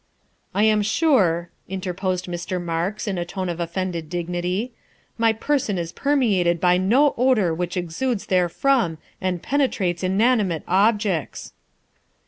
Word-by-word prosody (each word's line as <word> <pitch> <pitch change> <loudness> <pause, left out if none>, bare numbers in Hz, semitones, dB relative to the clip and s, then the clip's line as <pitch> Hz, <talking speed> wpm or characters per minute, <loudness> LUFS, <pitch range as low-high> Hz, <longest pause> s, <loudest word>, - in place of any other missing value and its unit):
' - - -37
I 205 - +3
am 215 -1 +4
sure," 200 - +2 0.2
interposed 185 -1 -3
Mr. 175 +1 -4
Marks 175 +6 -3
in 190 -3 -1
a - - -1
tone 185 +1 -4
of 170 0 -4
offended 170 -1 -3
dignity, 180 +6 -2 0.2
" - - -38
my 230 0 +4
person 225 -2 -1
is 170 -1 -3
permeated 200 - +1
by 180 +1 +4
no 245 +11 +3
odor 235 -10 +3
which 175 +2 -3
exudes 195 +7 -2
therefrom 185 +1 +1 0.2
and 185 -2 -2
penetrates 205 -11 0
inanimate 195 -3 +2
objects." 200 -3 0
185 Hz, 135 wpm, -22 LUFS, 175-220 Hz, 0.2 s, am